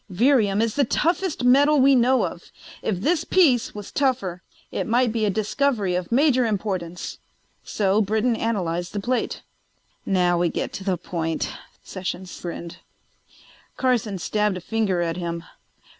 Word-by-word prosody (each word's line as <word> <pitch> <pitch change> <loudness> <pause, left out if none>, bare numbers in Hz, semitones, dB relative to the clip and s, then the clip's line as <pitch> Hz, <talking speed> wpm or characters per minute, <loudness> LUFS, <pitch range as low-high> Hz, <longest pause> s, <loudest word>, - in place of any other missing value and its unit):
Virium 215 0 +3
is 230 -2 -1
the 285 - +2
toughest 335 +4 0
metal 285 +4 +5
we 275 +1 +6
know 255 +1 +4
of; - - -8 0.3
if 190 -5 -1
this 325 - +1
piece 285 - +3
was 205 -1 -8
tougher 240 -11 0 0.3
it - - -3
might 240 +1 +2
be 220 -1 0
a - - +2
discovery 215 0 0
of 180 +2 -3
major 255 0 +4
importance. 190 -6 -3 0.4
So 200 0 +1
Britton 220 +4 +1
analyzed 175 -7 -2
the 205 - -2
plate." 245 +5 -2 0.6
"Now 180 -2 +2
we 175 -1 +2
get - - -3
to 195 - -6
the 190 -2 0
point," 165 -2 -3 0.3
Sessions 185 -1 -6
grinned. 170 -1 -6 1.0
Carson 240 -6 +1
stabbed 210 +2 0
a - - -7
finger 195 -3 0
at 165 0 -2
him. 170 -1 -4
210 Hz, 150 wpm, -23 LUFS, 180-250 Hz, 1.0 s, we